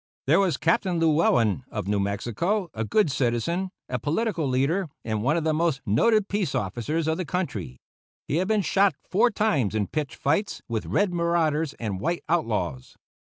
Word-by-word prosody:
There -, -, +4 dB
was 190 Hz, -4 st, +2 dB
Captain 170 Hz, +3 st, +1 dB
Llewellen, 125 Hz, -, +3 dB
of -, -, -4 dB
New 100 Hz, 0 st, +1 dB
Mexico, 120 Hz, -, -1 dB
a 110 Hz, -, -2 dB
good 165 Hz, -, +2 dB
citizen, 135 Hz, +10 st, 0 dB, 0.2 s
a 125 Hz, 0 st, -2 dB
political 165 Hz, -, -1 dB
leader, 145 Hz, +8 st, +1 dB, 0.2 s
and 110 Hz, -2 st, -1 dB
one 140 Hz, +8 st, +2 dB
of 165 Hz, -, -1 dB
the 160 Hz, 0 st, +1 dB
most 160 Hz, -3 st, +1 dB
noted 200 Hz, -, +3 dB
peace 200 Hz, -8 st, -1 dB
officers 120 Hz, -, -2 dB
of 160 Hz, 0 st, +1 dB
the 185 Hz, -, -2 dB
country; 115 Hz, -, -3 dB, 0.5 s
he 145 Hz, -, 0 dB
had 185 Hz, +2 st, 0 dB
been 215 Hz, -2 st, +2 dB
shot 195 Hz, +3 st, +3 dB, 0.2 s
four 225 Hz, +6 st, +4 dB
times 150 Hz, -, 0 dB
in 105 Hz, -2 st, +1 dB
pitched 150 Hz, +5 st, -3 dB
fights 160 Hz, +9 st, -1 dB
with 115 Hz, -2 st, -3 dB
red 200 Hz, -3 st, +1 dB
marauders 165 Hz, -3 st, +1 dB
and 105 Hz, -5 st, -4 dB
white 170 Hz, -, -2 dB
outlaws. 105 Hz, -, -1 dB
155 Hz, 175 wpm, -25 LUFS, 115-180 Hz, 0.5 s, There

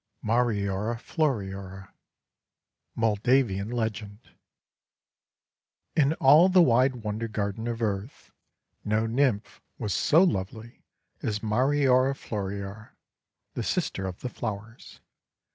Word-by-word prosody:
MARIORA 110 Hz, -2 st, 0 dB
FLORIORA 100 Hz, -, -3 dB, 1.0 s
Moldavian 110 Hz, -1 st, +1 dB
Legend 110 Hz, -2 st, -4 dB, 1.6 s
IN 145 Hz, -1 st, +3 dB
all 155 Hz, +5 st, +6 dB
the 185 Hz, 0 st, +5 dB
wide 125 Hz, -2 st, +2 dB
Wonder 110 Hz, +2 st, -3 dB
Garden 110 Hz, +1 st, -3 dB
of 115 Hz, -1 st, -3 dB
Earth 105 Hz, +3 st, -4 dB, 0.5 s
no 110 Hz, +1 st, 0 dB
Nymph 115 Hz, -2 st, 0 dB, 0.2 s
was 105 Hz, -4 st, -2 dB
so 160 Hz, -, +4 dB
lovely 110 Hz, -, -3 dB, 0.4 s
as 105 Hz, 0 st, -3 dB
Mariora 130 Hz, +3 st, +2 dB
Floriora, 100 Hz, -1 st, -6 dB, 0.6 s
the -, -, -3 dB
Sister 95 Hz, -1 st, -2 dB
of 90 Hz, -1 st, -7 dB
the 125 Hz, -, -4 dB
Flowers. 110 Hz, 0 st, -7 dB
110 Hz, 95 wpm, -27 LUFS, 100-125 Hz, 1.6 s, all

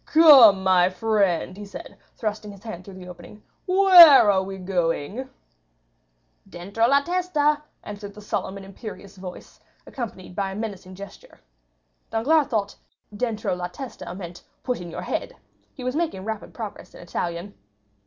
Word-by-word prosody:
"Come, 265 Hz, -12 st, +7 dB
my 185 Hz, -1 st, +4 dB
friend," 190 Hz, -3 st, 0 dB
he 205 Hz, -, -9 dB
said, -, -, -10 dB, 0.2 s
thrusting 215 Hz, -1 st, -4 dB
his 200 Hz, -1 st, -15 dB
hand 185 Hz, -6 st, -8 dB
through 195 Hz, 0 st, -12 dB
the 185 Hz, -1 st, -11 dB
opening, 180 Hz, +4 st, -13 dB, 0.2 s
"where 360 Hz, -, +8 dB
are 190 Hz, -1 st, +2 dB
we 195 Hz, 0 st, -7 dB
going?" 185 Hz, -, -2 dB, 1.2 s
"Dentro 200 Hz, +6 st, -1 dB
la 280 Hz, +2 st, +4 dB
testa!" 305 Hz, -4 st, 0 dB, 0.2 s
answered 205 Hz, 0 st, -9 dB
a -, -, -9 dB
solemn 200 Hz, -1 st, -4 dB
and 195 Hz, -, -10 dB
imperious 200 Hz, 0 st, -10 dB
voice, 185 Hz, -1 st, -11 dB, 0.3 s
accompanied 195 Hz, -8 st, -8 dB
by 195 Hz, -1 st, -2 dB
a -, -, -8 dB
menacing 195 Hz, -4 st, -7 dB
gesture. 200 Hz, +1 st, -13 dB, 0.7 s
Danglars 285 Hz, +7 st, +2 dB
thought 210 Hz, -6 st, -2 dB, 0.4 s
dentro 220 Hz, -3 st, -2 dB
la 180 Hz, 0 st, -4 dB
testa 245 Hz, +8 st, -9 dB
meant, 175 Hz, -2 st, -9 dB, 0.2 s
"Put 250 Hz, -6 st, -2 dB
in 175 Hz, -, -8 dB
your -, -, -7 dB
head!" -, -, -4 dB, 0.4 s
He 255 Hz, -, -9 dB
was 255 Hz, +2 st, -2 dB
making 310 Hz, -, -2 dB
rapid 220 Hz, -1 st, -5 dB
progress 220 Hz, -4 st, -9 dB
in -, -, -12 dB
Italian. 170 Hz, +3 st, -5 dB
205 Hz, 155 wpm, -23 LUFS, 185-250 Hz, 1.2 s, where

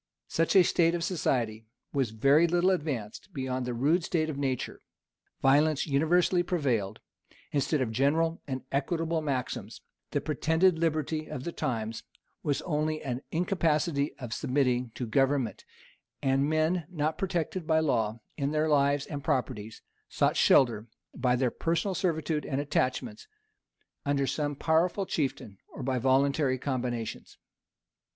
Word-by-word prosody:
Such 165 Hz, +4 st, +1 dB
a 190 Hz, -, +8 dB
state 170 Hz, -1 st, +3 dB
of 170 Hz, -, -2 dB
society 115 Hz, -, -1 dB, 0.3 s
was 135 Hz, -5 st, +1 dB
very 140 Hz, +9 st, +4 dB
little 175 Hz, +2 st, +3 dB
advanced 145 Hz, -, -3 dB
beyond 130 Hz, -2 st, -2 dB
the 125 Hz, -, -2 dB
rude 155 Hz, +8 st, +2 dB
state 160 Hz, -2 st, 0 dB
of 140 Hz, -, -7 dB
nature: 130 Hz, -3 st, -2 dB, 0.6 s
violence 145 Hz, +2 st, +4 dB
universally 165 Hz, +5 st, +3 dB
prevailed, 125 Hz, -, -1 dB, 0.5 s
instead 145 Hz, 0 st, +1 dB
of 120 Hz, -4 st, -1 dB
general 160 Hz, +7 st, +1 dB
and 130 Hz, -2 st, -4 dB
equitable 160 Hz, +3 st, 0 dB
maxims: 135 Hz, -4 st, -3 dB, 0.3 s
the -, -, 0 dB
pretended 160 Hz, +3 st, +2 dB
liberty 155 Hz, -1 st, -1 dB
of 130 Hz, -, -6 dB
the 170 Hz, -, -3 dB
times 115 Hz, -6 st, -3 dB, 0.4 s
was 145 Hz, -2 st, -1 dB
only 155 Hz, -1 st, -1 dB
an 130 Hz, -2 st, -3 dB
incapacity 160 Hz, -4 st, 0 dB
of 120 Hz, -4 st, -6 dB
submitting 125 Hz, -2 st, 0 dB
to 125 Hz, -, -3 dB
government: 135 Hz, +1 st, +1 dB, 0.5 s
and 135 Hz, +2 st, +1 dB
men, 155 Hz, +1 st, +1 dB
not 155 Hz, -1 st, -2 dB
protected 180 Hz, -3 st, -2 dB
by 160 Hz, -1 st, +4 dB
law 115 Hz, -7 st, 0 dB, 0.2 s
in 140 Hz, -1 st, 0 dB
their 155 Hz, +1 st, +1 dB
lives 140 Hz, -1 st, +2 dB
and 145 Hz, -2 st, -6 dB
properties, 115 Hz, -6 st, -2 dB, 0.3 s
sought -, -, +1 dB
shelter, 115 Hz, -4 st, +4 dB, 0.3 s
by 125 Hz, -1 st, +1 dB
their 125 Hz, -1 st, +1 dB
personal 170 Hz, +4 st, -1 dB
servitude 160 Hz, -4 st, -1 dB
and 135 Hz, -, -2 dB
attachments, 145 Hz, -, -1 dB, 0.8 s
under 140 Hz, -1 st, +1 dB
some 145 Hz, +2 st, -1 dB
powerful 170 Hz, +6 st, +1 dB
chieftain, 135 Hz, -, -3 dB
or 135 Hz, -, -9 dB
by 130 Hz, 0 st, 0 dB
voluntary 135 Hz, +1 st, +2 dB
combinations. 125 Hz, -4 st, -4 dB
145 Hz, 140 wpm, -29 LUFS, 130-160 Hz, 0.8 s, a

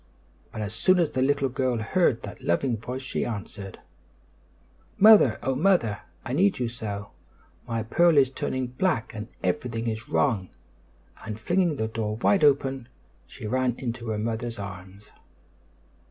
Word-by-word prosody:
But 110 Hz, -, -6 dB
as 105 Hz, 0 st, -5 dB
soon 185 Hz, -, +3 dB
as 170 Hz, -4 st, +2 dB
the 130 Hz, -, -1 dB
little 140 Hz, +1 st, +2 dB
girl 130 Hz, -1 st, -1 dB
heard 120 Hz, +2 st, +1 dB
that 100 Hz, -, -8 dB
loving 115 Hz, +8 st, +1 dB
voice 125 Hz, +4 st, -6 dB
she 130 Hz, -, -2 dB
answered: 100 Hz, -3 st, -6 dB, 1.2 s
"Mother! 205 Hz, -, +7 dB
Oh, 135 Hz, -, +1 dB
Mother! 135 Hz, -, +2 dB, 0.3 s
I 125 Hz, -, -3 dB
need 190 Hz, +7 st, +3 dB
you 125 Hz, -, -1 dB
so! 105 Hz, -4 st, -6 dB, 0.6 s
My 115 Hz, -2 st, -2 dB
pearl 170 Hz, +8 st, +3 dB
is 135 Hz, -2 st, +5 dB
turning 130 Hz, -1 st, -2 dB
black 125 Hz, 0 st, -1 dB
and 110 Hz, -1 st, -6 dB, 0.2 s
everything 115 Hz, +6 st, -1 dB
is 110 Hz, +1 st, -4 dB
wrong!" 105 Hz, -9 st, +1 dB, 0.7 s
and, 110 Hz, -1 st, -6 dB
flinging 175 Hz, -, +1 dB
the 110 Hz, -5 st, -1 dB
door 110 Hz, -1 st, -3 dB
wide 155 Hz, -, +2 dB
open, 135 Hz, -3 st, +2 dB, 0.4 s
she -, -, -10 dB
ran 125 Hz, +2 st, 0 dB
into 120 Hz, -2 st, -5 dB
her 110 Hz, -1 st, -1 dB
mother's 115 Hz, +2 st, -3 dB
arms. 95 Hz, 0 st, -9 dB
120 Hz, 155 wpm, -26 LUFS, 110-135 Hz, 1.2 s, Mother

